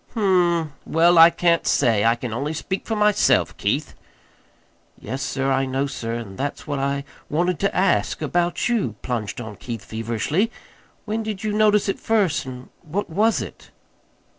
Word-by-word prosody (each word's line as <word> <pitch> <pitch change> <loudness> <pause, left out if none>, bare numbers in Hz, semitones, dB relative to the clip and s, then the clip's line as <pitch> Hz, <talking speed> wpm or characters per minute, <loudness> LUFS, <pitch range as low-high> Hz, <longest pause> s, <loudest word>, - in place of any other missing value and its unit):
"Hm 185 -5 +3
m; 160 -3 -4
well, 170 +1 +4
I 165 +1 +10
can't 170 -1 +1
say. 115 -6 +3
I 115 +1 +4
can 120 -1 -5
only 145 +6 -2
speak 190 +4 -4
for 225 - -1
myself, 210 -1 +3
Keith." - - -1 1.1
"Yes, 130 +5 -5
sir, 135 0 -1
I 135 0 +1
know, 135 +2 0
sir; 120 -4 -4
and 105 -5 -7
that's 145 +1 -3
what 145 -2 -3
I 140 0 -1 0.3
wanted 175 +2 0
to 200 - 0
ask 185 -1 +2
about 175 0 0
you," 215 - 0
plunged 115 -4 -3
on 110 -3 -7
Keith 115 -4 -7
feverishly. 115 - -1 0.6
"When 220 +1 -2
did 215 -3 -5
you 215 -1 -1
notice 210 -1 +3
it 195 - -1
first, 195 -11 +1
and 125 0 -9
what 180 +3 -4
was 215 +6 +2
it?" - - -12
155 Hz, 170 wpm, -22 LUFS, 125-195 Hz, 1.1 s, I